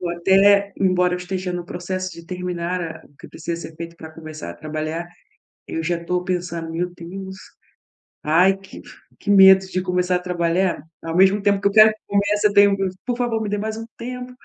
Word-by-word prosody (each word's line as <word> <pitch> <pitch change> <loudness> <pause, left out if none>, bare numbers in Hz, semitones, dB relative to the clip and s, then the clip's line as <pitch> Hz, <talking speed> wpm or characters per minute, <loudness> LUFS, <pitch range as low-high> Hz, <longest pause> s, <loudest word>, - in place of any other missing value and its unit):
Ou 175 -2 -3
até, 195 +3 +4
embora 180 -1 +2
eu - - -3
esteja 180 0 -4
no 175 -1 -4
processo 185 0 -4
de 170 -1 -12
terminar 180 -1 -3
a 165 -1 -7
o 145 - -28
que - - -13
precisa 170 +1 -5
ser 160 - -17
feito 170 0 -7
pra 160 -1 -10
começar 155 - -8
a 85 - -9
trabalhar, 155 - -4 0.6
eu 165 - -4
já 170 0 -2
tô 180 +1 -1
pensando: 175 -2 -3
"Meu 175 +2 -2
Deus, 190 +2 -8 0.9
ai 180 +5 +4
que 195 0 -13
f - - -14 0.2
que 205 - -1
medo 190 -1 +8
de 185 -1 -3
começar 180 0 0
a - - -5
trabalhar". 175 -2 0 0.2
Ao 165 0 -5
mesmo 195 +2 +5
tempo 200 -1 +2
que 200 - +2
eu - - 0
quero 215 +1 +8
que 215 - -14
comece, 205 +1 +1
eu 205 - -4
tenho 200 0 +7
uma 195 - 0
coisa: 190 -1 -2
"Por 245 -1 -2
favor, 235 -3 -1
me 210 - -3
dê 205 - -1
mais 220 +1 -4
um 225 - -6
tempo 250 +1 -6
180 Hz, 220 wpm, -21 LUFS, 170-200 Hz, 0.9 s, medo